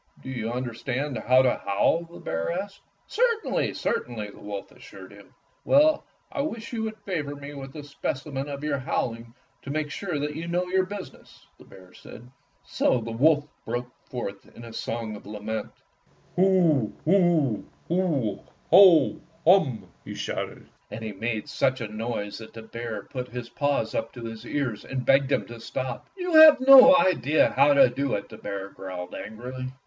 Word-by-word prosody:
"Do 130 - -6
you 115 -3 -3
understand 125 +3 -3
how 130 +1 +4
to 125 - +1
howl?" 130 +12 +1
the 170 +1 -13
bear 80 0 -2
asked. 195 +3 -5 0.2
"Certainly, 465 -1 0
certainly," 110 -4 -3
the - - -16
wolf 100 -1 -7
assured - - -13
him. - - -17 0.3
"Well, 300 +2 +4 0.3
I 280 - -2
wish 230 -5 -5
you 225 - -2
would 220 0 -4
favor 165 -9 -4
me 145 0 -9
with 135 0 -9
a 150 - -7
specimen 140 0 -4
of 140 0 -6
your 145 -2 -1
howling 115 -2 -3 0.3
to - - -10
make 150 0 -2
sure 175 -3 -3
that 150 +1 -3
you 165 +2 -5
know 175 +1 0
your 185 +1 +1
business," 200 -1 -10
the - - -15
bear 90 -1 -16
said. 120 +2 -13 0.3
So 125 - +1
the 115 0 -6
wolf 145 +5 +3 0.2
broke 120 +1 -4 0.2
forth 100 -6 -6
in 120 - -10
a 115 - -10
song 115 -1 -4
of 100 - -12
lament. 105 +1 -4 0.7
"Hu, 175 - +3
hu, 165 - +3 0.2
hu, 150 - 0 0.3
hum, 165 - +7 0.3
hoh!" 155 - +3 0.3
he - - -8
shouted, - - -5 0.2
and 110 - -7
he 110 - -4
made 110 +4 -3
such 135 -2 0
a 115 - -4
noise 105 -1 -4
that 110 - -11
the 115 - -9
bear 115 0 -6
put 125 -1 -6
his 125 -1 -7
paws 140 -2 -1
up 115 0 -3
to 120 - -9
his 115 -1 -8
ears 130 -7 -2
and 130 -1 -4
begged 135 0 +4
him - - +1
to 120 0 -10
stop. 130 +3 -5
"You 360 -2 -3
have 310 -3 +9
no 270 +1 +9
idea 170 - +3
how 140 +2 +4
to 140 - +7
do 135 +3 -1
it," 100 - -5
the - - -11
bear 100 -1 -5
growled 90 -2 -8
angrily. 125 +4 -7
135 Hz, 180 wpm, -26 LUFS, 115-170 Hz, 0.7 s, have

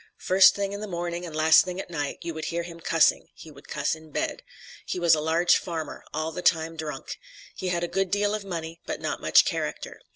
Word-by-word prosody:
First 185 0 +6
thing 200 0 -2
in 200 - -5
the 215 - -5
morning 175 -1 -4
and 160 - -8
last 155 +2 +6
thing 180 -1 -5
at 185 - -7
night, 145 -4 -3
you 170 0 -4
would 160 0 -5
hear 170 0 -2
him 170 -1 -9
cussing 165 -1 +2
he 160 - -12
would 140 0 -16
cuss - - -1
in 160 0 -10
bed. - - -3 0.4
He - - -4
was 170 -1 +5
a 155 - +2
large 165 +3 +3
farmer, 165 -3 -5
all 155 +1 -2
the 180 - -5
time 165 -2 +2
drunk. 155 -2 -6 0.4
He 185 - -4
had 175 -1 0
a - - 0
good 195 +1 -1
deal 205 +2 +1
of 215 -1 -3
money 165 -3 -6
but - - -3
not - - -3
much - - +5
character. - - -4
170 Hz, 235 wpm, -26 LUFS, 160-180 Hz, 0.4 s, First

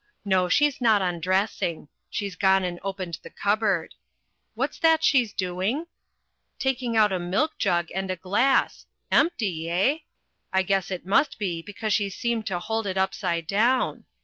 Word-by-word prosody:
No, 185 -2 +2
she's 290 +6 +2
not 220 -4 +4
undressing 180 -2 -1 0.2
she's 200 -3 -4
gone 190 0 +3
and 175 -1 -3
opened 190 -3 -5
the - - -11
cupboard. 205 -5 0 0.6
What's - - -2
that 320 -1 +4
she's 250 -8 +3
doing 190 - -2 0.7
taking 250 -3 -1
out 210 -2 +5
a 185 - 0
milk 195 - -1
jug 175 -4 +1
and 190 +1 -3
a 185 - -1
glass 205 +10 +1 0.2
empty, 200 - +1
eh? 195 - +2 0.5
I 190 0 +2
guess 195 0 0
it 185 -2 -5
must 220 +10 +2
be, 180 -6 -2
because 205 +3 -3
she 205 -1 +1
seemed 230 +2 -2
to 190 -4 -1
hold 220 +4 -2
it 190 0 -2
upside 185 -3 -1
down. 235 +8 +1
195 Hz, 155 wpm, -25 LUFS, 180-225 Hz, 0.7 s, out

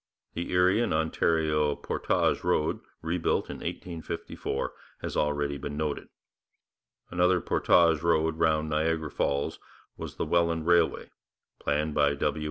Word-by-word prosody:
The 85 +1 -4
Erie 90 +4 +4
and 115 - +1
Ontario 80 -1 +1
portage - - 0
road, 75 +1 +1 0.2
rebuilt 80 +1 0
in - - -6
1854, 80 -5 -4 0.3
has - - -4
already 75 -1 0
been 75 +1 -5
noted. 75 -2 -2 1.0
Another 90 +1 +3
portage 85 -2 +3
road 80 -1 +1
round 80 -1 +2
Niagara 80 0 0
Falls 70 0 -1 0.4
was - - -7
the - - -2
Welland 85 -2 +1
Railway, 85 -1 +2 0.5
planned 75 +1 0
by 70 -1 +3
W. 75 +1 -1
80 Hz, 125 wpm, -28 LUFS, 75-85 Hz, 1.0 s, Erie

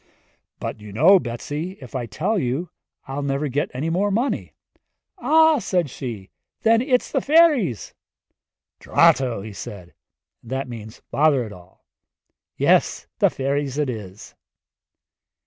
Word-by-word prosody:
'But - - -5
you 105 -1 -10
know, 165 - +6
Betsi, 145 +7 -5
if 130 -4 -12
I 125 -3 -3
tell 185 - -1
you 140 +6 -2 0.4
I'll 135 +2 -4
never 140 +1 -1
get 140 +2 -1
any 150 +6 -3
more 195 +4 +1
money.' 235 +7 -1 0.6
'Ah,' 320 -1 +5
said 180 - -1
she, 110 -9 -7 0.3
'then 230 0 +4
it's 250 -1 +1
the - - +1
fairies!' 290 - +3 0.9
'Drato!' 120 -7 +3
said 90 -4 -8
he - - -28 0.5
and 120 - -14
that 135 0 -2
means 110 -2 -10
'Bother 145 -3 +3
it 105 - -9
all' 90 0 -17 0.7
'yes - - +2
the - - +5
fairies 140 0 -2
it 145 -4 0
is.' 105 -3 -9
140 Hz, 135 wpm, -22 LUFS, 120-185 Hz, 0.9 s, know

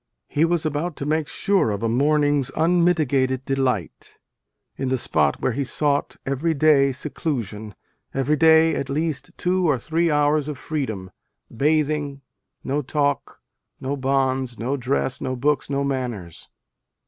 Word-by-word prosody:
He 155 +3 +2
was 165 -1 0
about 155 +2 -2
to 140 - -5
make 155 0 0
sure 195 - +1
of 100 +1 -3
a - - +2
morning 145 +4 +2
s 135 -1 -3
unmitigated 155 -7 +2
delight, 130 - -2 0.6
in 135 - -2
the 130 - +1
spot 75 - +1
where - - 0
he 140 +4 -1
sought, 145 +2 -1
" - - -49
every 145 +5 0
day, 140 -2 +4
seclusion 115 - -4 0.4
every 135 +3 +1
day 160 +1 +5
at 140 - -3
least 155 +1 -2
two 180 -1 +1
or 140 - +3
three 165 +7 0
hours 150 0 +2
of 150 -3 -4
freedom, 110 -12 -4 0.4
bathing, 150 0 0 0.4
no 140 +2 -1
talk, 145 +1 -1 0.4
no 135 +2 -2
bonds, 130 -2 0
no 125 +5 -1
dress, 130 0 -1
no 130 - -2
books, 145 +4 0
no 140 0 0
manners." 125 - -4
140 Hz, 150 wpm, -23 LUFS, 130-155 Hz, 0.6 s, day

